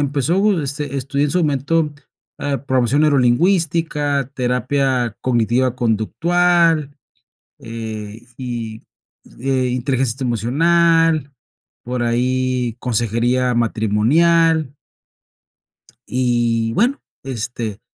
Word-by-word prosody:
empezó, 165 - +1
este, 140 0 -4
estudié 140 +2 -1
en - - -3
su 180 - +1
momento, 150 +1 0 0.5
ah, 140 -2 -3
programación 130 +3 +2
neurolingüística, 145 0 +1
terapia 125 -1 0
cognitiva 120 +1 +1
conductual, 160 +6 +1 0.6
eh, 110 -1 -7
y, 115 -4 -5 0.6
eh, 130 0 0
inteligencia 130 0 -1
emocional, 160 - +2 0.5
por 125 0 -3
ahí 125 0 0
consejería 120 +2 0
matrimonial 140 +8 +2 1.3
y 120 -2 0
bueno, 245 - +1 0.2
este, 120 -4 -5
130 Hz, 80 wpm, -19 LUFS, 120-150 Hz, 1.3 s, programación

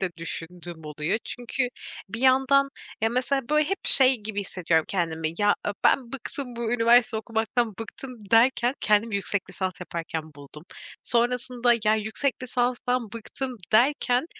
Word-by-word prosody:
de 190 -2 -1
düşündüğüm 170 0 -7
oluyor. 150 +7 -2
Çünkü 245 +1 -3 0.4
bir 225 +4 -6
yandan, 265 +1 +4 0.3
ya, 225 - +2
mesela, 255 +2 -1
böyle, 300 0 +2
hep 390 0 -1
şey 265 -1 +6
gibi 210 -1 -4
hissediyorum 170 -5 0
kendimi, 160 -4 -1
"ya 205 0 +4
e - - +1
ben 255 -2 +3
bıktım 265 -1 -6
bu 235 -1 -2
üniversite 240 0 +4
okumaktan, 225 0 -1
bıktım." 225 -2 -9
derken 240 +2 +4
kendimi 215 +1 +2
yüksek 200 0 -1
lisans 185 -1 -4
yaparken 160 -3 -5
buldum. 145 +2 -12 0.4
Sonrasında, 245 0 +2
yani, 215 0 +3
yüksek 255 +5 -2
lisanstan 250 -2 -1
bıktım, 250 +3 -5 0.2
derken 250 +3 +3
230 Hz, 140 wpm, -25 LUFS, 195-250 Hz, 0.4 s, şey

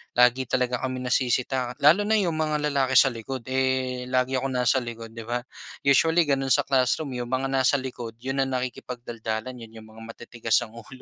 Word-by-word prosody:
lagi 125 +1 +4
talaga 125 -1 0
kaming 130 -1 -3
nasisita. 125 0 0
Lalo 195 +8 +5
na 220 - +3
'yung 185 -5 +2
mga 155 -1 -1
lalaki 135 -1 +1
sa 130 +1 +6
likod, 120 +2 -6
eh, 130 0 +1 0.2
lagi 130 +1 0
akong 135 0 -2
nasa 125 +1 +2
likod, 115 -2 -5
'di 115 -1 -9
ba? 120 +1 -2 0.4
Usually 160 +5 +4
gano'n 135 -2 +2
sa - - +4
classroom 135 +2 +1
'yung 120 -1 -4
mga 130 +1 -1
nasa 135 +1 +3
likod, 120 -3 -6
'yun 135 +1 -3
ang 135 - -4
nakikipagdaldalan, 120 -1 -5
'yun 115 -1 -12
'yung 110 - -15
mga 110 +1 -14
matitigas 115 0 -5
ang 115 - -6
ulo. 130 +3 -12
130 Hz, 190 wpm, -25 LUFS, 120-135 Hz, 0.4 s, sa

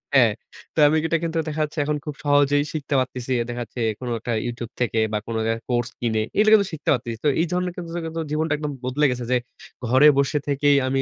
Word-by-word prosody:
হ্যাঁ। 120 -5 +6 0.4
তো - - 0
আমি 155 +2 +3
এটা 165 - +2
কিন্তু 165 0 -2
দেখা 155 +1 -2
যাচ্ছে 150 +1 -4
এখন 150 0 0
খুব 150 -2 -5
সহজেই 145 0 +4
শিখতে 150 -2 -3
পারতেছি। 130 0 -3 0.2
দেখা 120 0 -4
যাচ্ছে 115 - -10 0.2
কোন 125 - -6
একটা 120 +1 -3
YouTube 120 0 -5
থেকে 115 -2 +1
বা, - - +2
কোন 115 - -3 0.2
এক 115 - -5
কোর্স 120 -1 0
কিনে, 110 -2 0 0.2
এগুলা 215 +1 +5
কিন্তু 200 -3 +5
শিখতে 160 - -4
পারতেছি। 115 -3 -3
তো - - +5
এই 170 - +2
ধরনের 180 0 0
কিছু 175 -2 -7
জায়গায় 165 -1 -4
তো - - 0
জীবনটা 155 0 0
একদম 150 0 -3
বদলে 130 +4 +1
গেছে। 125 0 -3
যে 125 - +4 0.5
ঘরে 130 +5 +6
বসে 140 +1 +2
থেকেই 145 0 +3
আমি 135 +1 +1
145 Hz, 230 wpm, -23 LUFS, 120-155 Hz, 0.5 s, হ্যাঁ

